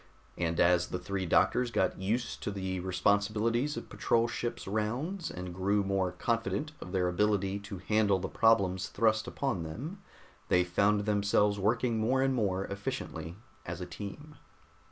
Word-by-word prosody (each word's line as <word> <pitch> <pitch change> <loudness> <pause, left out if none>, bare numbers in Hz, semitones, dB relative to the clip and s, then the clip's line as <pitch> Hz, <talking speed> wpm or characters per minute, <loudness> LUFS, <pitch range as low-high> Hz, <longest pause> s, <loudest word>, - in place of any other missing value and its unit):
And 85 -1 -1
as 90 0 +4
the - - -3
three 95 -1 -3
doctors 125 +8 +3
got 105 -5 0
used 115 +6 -1
to - - -2
the 95 -2 -3
responsibilities 105 +8 +1
of - - -4
a - - -20
patrol 115 0 +1
ship's 120 0 -4
rounds, 125 - -2
and 90 0 -6
grew 100 +3 +1
more 95 -2 0
confident 115 +10 -1
of 90 - -7
their 90 -2 +1
ability 100 +1 +1
to 100 -1 -7
handle 100 +1 +2
the 95 - -3
problems 100 -4 +3
thrust 110 -2 +1
upon 135 -11 -2
them, 140 - -6 0.5
they 90 - +4
found 100 +4 +2
themselves 105 0 +2
working 115 +3 +1
more 130 +4 +2
and 135 0 +2
more 100 -5 0
efficiently 100 - -5 0.3
as 85 +1 -5
a 90 - -4
team. 105 - -8
100 Hz, 160 wpm, -31 LUFS, 95-115 Hz, 0.5 s, as